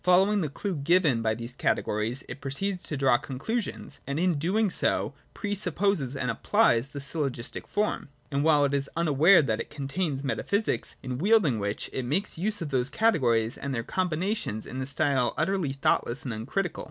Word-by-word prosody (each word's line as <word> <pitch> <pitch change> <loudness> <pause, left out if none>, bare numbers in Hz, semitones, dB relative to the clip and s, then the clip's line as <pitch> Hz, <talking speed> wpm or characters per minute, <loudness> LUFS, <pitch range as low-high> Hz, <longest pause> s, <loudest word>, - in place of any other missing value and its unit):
following 190 +3 +4
the 155 - -1
clue 190 +6 -3
given 150 -4 +3
by 110 -1 +1
these 115 +2 -7
categories 115 +1 -1
it - - -8
proceeds 180 +7 -2
to 150 - -4
draw 130 -3 +4
conclu 185 - -2
sions, 145 - -8
and 140 +1 -2
in 180 +1 +3
so 145 - -3
doing 195 +5 +1 0.2
pre 205 -1 -2
supposes 180 -7 0
and 125 -2 -1
applies 135 - +2
the 145 - -7
syllogistic 140 -4 -4
form. 210 -7 -1 0.2
And 140 - -1
all - - +2
the - - 0
while 150 -2 +5
it 140 - -1
is 140 -1 0
unaware 165 +2 +5
that 110 -5 -1
it - - -7
contains 145 0 -3
metaphysics 200 +10 -1
— - - -35
in 130 -1 -4
wielding 185 - +3
which, 100 +1 -2
it 130 - -2
makes 165 +12 -1
use 205 +2 0
of 150 - -6
those 130 -1 +1
categories 120 - +2
and 140 -1 -3
their 115 - -2
combinations 180 - -1
in 130 - -5
a 130 - -3
style 140 -3 +1
utterly 190 -7 0
thoughtless 135 -1 0
and 125 - -3
uncritical. 140 - -3
145 Hz, 195 wpm, -27 LUFS, 130-185 Hz, 0.2 s, while